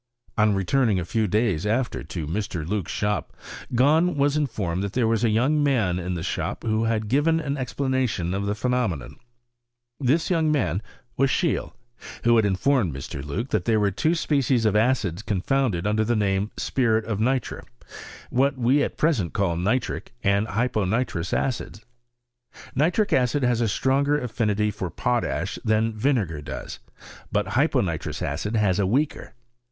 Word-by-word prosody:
On 105 -2 +3
returning 105 +2 +2
a 85 - -3
few 110 +4 0
days 100 -5 +1
after 115 +4 -1
to 80 -4 -5
Mr. 85 -1 -3
Loock's 100 -2 -2
sliop, 105 0 -1 0.5
Gahn 155 +7 +4
was 145 0 +2
iii 150 -2 +1
fonned 95 -7 -3
that 100 0 -3
there 120 -3 +2
was 115 0 +1
a 115 - +3
young 130 +8 +2
man 110 -11 +1
in 90 0 -3
the 85 - -4
shop - - -3
who 110 0 +1
had 110 -1 0
given 150 +7 +2
an 145 -3 -2
explanation 130 -8 -1
of 100 +1 -2
the 105 - 0
phenomenon. 105 - -1 0.8
This 145 +7 +1
young 160 -3 +2
man 115 - 0 0.4
was 135 +1 +3
Seheele, 170 +4 0 0.5
who 120 0 +5
had 110 - +4
informed 100 - +1
Mr. 70 0 -6
Loock 95 - -4
that - - 0
there 110 -2 +3
were 100 -1 +2
two 155 - +1
species 135 -7 +1
of 105 -1 +2
acids 105 -6 +1
con 105 -4 -2
founded 110 -5 0
under 105 +1 +2
the 120 +2 +1
name 100 -2 +1
of 105 - -15
spiril 115 -4 +1
of 110 -3 -2
nitre; 125 +2 -1 0.7
what 135 +2 +2
we 130 +4 +3
at - - -2
present 130 - +1
call 95 -5 0
nitric 110 +9 -1
and 100 +2 +2
hyponitrous 110 -4 -1
acidi* 120 -4 -2 0.9
Nitric 175 - +1
acid 130 +1 +2
has 120 -1 +2
a 115 - +2
stronger 140 +7 +1
affinity 105 -4 0
for 95 -3 -4
potash - - -1
thu 110 +1 +2
vinegar 110 - 0
has; - - -6 0.5
but - - 0
hyponitrous - - 0
acid 90 +10 -2
has 105 -3 +2
a 100 - +2
weaker. 140 +6 -1
110 Hz, 170 wpm, -24 LUFS, 100-130 Hz, 0.9 s, who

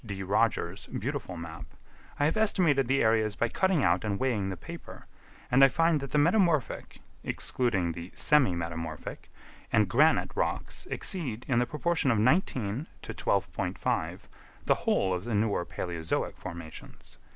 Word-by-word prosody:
D. 100 -4 -5
Rogers' 100 -2 0
beautiful 95 - -4
map, 85 -1 -7 0.5
I 145 - +3
have 155 - +2
estimated 175 - +3
the 135 +2 +2
areas 110 -1 +2
by 120 - 0
cutting 190 -3 +1
out 90 +1 +2
and 100 -2 -2
weighing 115 -7 0
the 95 - -4
paper, - - -10 0.5
and 130 +2 +6
I - - +10
find 165 +3 +2
that 140 -1 -6
the 150 - 0
metamorphic 170 - +1 0.2
(excluding 95 -9 0
the 85 +2 -8
"semi 145 - +3
metamorphic") 80 -2 -5 0.4
and - - +4
granite - - +3
rocks - - -3
exceed, 130 - -1
in 125 -3 +2
the 120 - +1
proportion 160 -1 0
of 115 - +3
19 125 - +1 0.2
to - - -6
12.5, - - -1 0.4
the - - +5
whole 95 -1 +1
of 90 0 -3
the 115 -1 -2
newer 100 -4 0
Palæozoic 85 -3 -3
formations. 85 -2 -10
115 Hz, 150 wpm, -29 LUFS, 95-145 Hz, 0.5 s, I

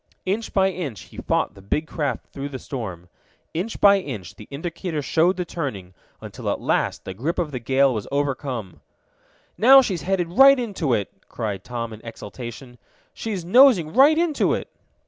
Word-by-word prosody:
Inch 210 +4 -2
by 190 -1 +2
inch 150 - -5
he - - -15
fought - - -1
the 100 - -15
big 145 +11 -1
craft 145 -7 -3
through 140 +1 -5
the 135 - -6
storm. 95 -11 -6 0.5
Inch 190 +8 -3
by 200 -1 +6
inch 110 - -7
the 105 - -13
indicator 165 +2 -4
showed 170 +7 +2
the 180 - -2
turning, 110 - -5 0.3
until - - -6
at - - -1
last - - -1
the 95 - -5
grip 145 - -3
of 165 -4 -1
the 130 - -4
gale 135 +2 +2
was 105 -3 -4
overcome. 135 - -3 0.8
"Now 265 +4 +8
she's 190 -8 -2
headed 180 -2 -1
right 270 +8 +7
into 190 - -1
it!" 100 -3 -3 0.2
cried 100 -3 -4
Tom 115 -2 -5
in 110 - -11
exultation. 120 +2 -9 0.3
"She's 200 -6 -4
nosing 200 - +5
right 285 +5 +6
into 330 -3 +2
it!" - - -6
145 Hz, 175 wpm, -23 LUFS, 115-190 Hz, 0.8 s, Now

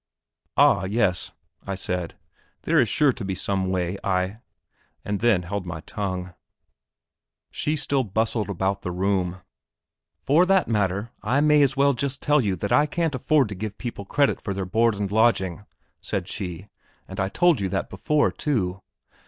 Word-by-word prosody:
"Ah, 95 - +5
yes," 95 -3 0 0.4
I 100 - -2
said, 90 -2 -3 0.5
"there - - +3
is - - +3
sure 145 -3 +3
to 120 - -7
be 95 -1 -2
some 95 0 -1
way!" 90 0 -1 1.1
and 100 -1 -2
then 110 -7 +3
held 90 +1 -4
my 85 -2 -5
tongue. 90 0 -4 1.2
She 150 - -1
still 140 -2 0
bustled 110 +1 -1
about 95 +1 -1
the - - -4
room. 90 -1 -1 0.8
"For 160 +7 +3
that 195 -1 +3
matter, 105 0 0
I 125 +6 +1
may 150 0 +5
as 135 -1 +2
well 140 0 +4
just 135 +2 -3
tell 150 -1 +3
you 100 -5 0
that 100 +3 -4
I 150 +1 +4
can't 165 0 -1
afford 130 +1 +2
to - - -4
give 105 +2 -5
people 115 -5 -6
credit 140 +7 +1
for 100 - -3
their 95 -1 -2
board 115 +4 +2
and 100 -1 -3
lodging," 105 -4 +2 0.4
said 95 -3 -3
she, 95 -2 -5 0.4
"and 95 - -8
I 95 0 0
told 170 - +3
you 95 - -1
that - - -2
before, 150 -1 +1
too." 95 -10 -1
100 Hz, 170 wpm, -24 LUFS, 95-135 Hz, 1.2 s, Ah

